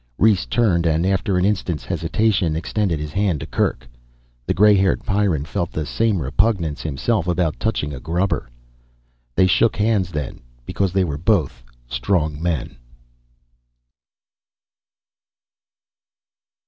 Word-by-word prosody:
Rhes 105 -2 +3
turned 95 -8 +2
and 80 +2 +1
after 95 0 +1
an 90 - +2
instant's 95 -6 -1
hesitation, 95 -7 0
extended 85 0 -1
his 75 0 -5
hand 95 -6 +1
to - - -6
Kerk. - - -1 0.6
The - - +2
gray 105 +2 +6
haired 95 -1 +1
Pyrran 95 -8 +1
felt 85 +2 -3
the 75 - -3
same 110 +3 0
repugnance 85 - 0
himself 80 - -1
about 85 -3 0
touching 100 -10 -1
a 65 - -6
grubber. 85 -1 -1 0.9
They 95 - +5
shook 110 +4 +3
hands 105 -4 +1
then 75 -6 -5 0.3
because 100 -2 -1
they 95 +1 +2
were 75 -5 -3
both 75 - +1 0.2
strong 75 +5 -1
men. 80 -10 -2
90 Hz, 125 wpm, -21 LUFS, 75-100 Hz, 0.9 s, gray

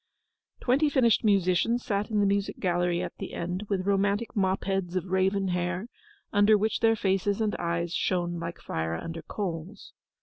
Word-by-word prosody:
Twenty 275 +5 +3
finished 245 -6 +3
musicians 200 +3 +2
sat 205 +1 -1
in 210 -2 +1
the - - +3
music 200 0 0
gallery 175 -1 +1
at - - -6
the - - -6
end, 180 +4 -4
with 190 -2 -1
romantic 200 +4 +1
mop 190 -2 +1
heads 190 -2 -2
of 185 -1 -1
raven 190 +1 +1
hair, 180 +4 -2 0.4
under 205 +1 +5
which 215 +2 0
their 225 0 +4
faces 195 0 0
and 215 -2 0
eyes 170 0 -1
shone 175 -2 0
like 170 +1 -5
fire 80 0 -3
under 165 - -6
coals. 180 -1 -6
195 Hz, 170 wpm, -28 LUFS, 175-205 Hz, 0.4 s, under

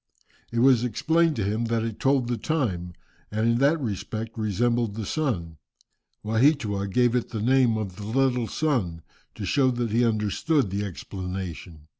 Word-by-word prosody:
It 115 0 0
was 125 -2 +5
explained 160 +6 +2
to 110 - -1
him 110 +4 -1
that 115 -1 0
it 115 -2 -4
told 135 -2 +2
the 120 - 0
time, 105 - -2 0.4
and 110 +2 0
in 115 0 +3
that 145 +5 +3
respect 110 -1 -4
resembled 115 +1 0
the 110 -2 -4
sun. 95 - -2 0.7
Waheatua 110 -3 +2
gave 120 +4 +2
it 125 - -1
the 110 - -4
name 125 0 +3
of 95 -4 -5
the 105 - -7
"little 125 0 +1
sun," 105 - -1 0.3
to - - -5
show 135 -2 +3
that 120 -3 -2
he 120 +3 +3
understood 110 - +1
the 100 +1 -1
explanation. 90 -4 -6
115 Hz, 165 wpm, -25 LUFS, 100-130 Hz, 0.7 s, was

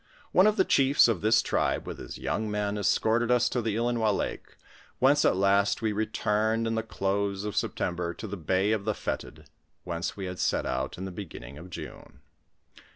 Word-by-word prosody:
One 185 +3 +6
of 215 - +3
the 190 - +3
chiefs 135 0 +5
of 110 -7 0
this 110 +2 +4
tribe - - 0
with - - -7
his - - -8
young 110 +1 -2
men, 105 0 -1
escorted 110 +3 +1
us 125 -1 +4
to 125 - -1
the 110 -2 -1
Ilinois 115 -1 +1
lake, - - -5 0.4
whence 140 +3 +4
at - - +4
last 100 +3 +2
we 110 - +1
returned 110 +1 0
in 115 - -1
the 110 - 0
close 100 -2 -2
of 105 -2 -4
September 85 -1 -1
to - - -7
the 100 -1 -5
bay 95 +4 +1
of 110 -2 0
the 110 -2 0
Fetid, 80 0 -5 0.4
whence 85 +2 -4
wo 100 - -5
had 90 -1 -5
set - - +1
out 65 +3 -2
in 95 - -5
the 95 - -5
beginning 75 -8 -9
of 90 +3 -11
June. 90 - -10
105 Hz, 200 wpm, -28 LUFS, 95-115 Hz, 0.4 s, One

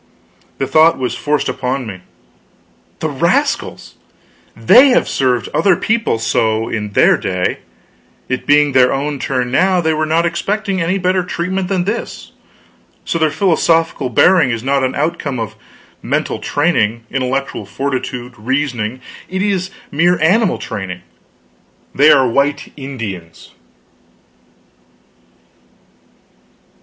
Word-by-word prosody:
The 135 - -1
thought 155 +4 +4
was 125 -1 -2
forced 150 -1 -1
upon 130 0 -2
me: 95 -4 -8 1.0
"The - - 0
rascals - - -1 0.6
they 235 - +6
have 250 - +2
served 125 -3 0
other 195 -3 +3
people 225 - 0
so 110 0 0
in 105 -2 -4
their - - +4
day; 90 -1 -2 0.7
it 130 - -3
being 145 0 +4
their 130 -1 +4
own 140 +1 -2
turn, 125 -2 -2
now, 185 +6 +3
they 160 -2 +1
were 155 0 -1
not 165 +2 +2
expecting 195 +3 -2
any 175 +4 0
better 185 0 +1
treatment 180 +1 -3
than 185 -2 0
this; 210 +5 -5 0.7
so 165 - -1
their 160 -1 +3
philosophical 165 -5 +1
bearing 175 +5 +4
is 115 -2 -3
not 135 0 +1
an 130 - -1
outcome 150 -4 -2
of 110 -1 -5 0.5
mental - - -2
training, 115 -8 0
intellectual 135 -5 -2
fortitude, 125 +1 -4
reasoning; 130 -1 -2 0.3
it 190 +1 -2
is 190 -3 -1 0.2
mere 175 +4 +2
animal 190 +6 +2
training; 95 -5 -6 0.9
they 150 +2 +5
are 130 -2 +4
white 140 +4 -1
Indians." 110 - -8
140 Hz, 125 wpm, -16 LUFS, 125-175 Hz, 1.0 s, they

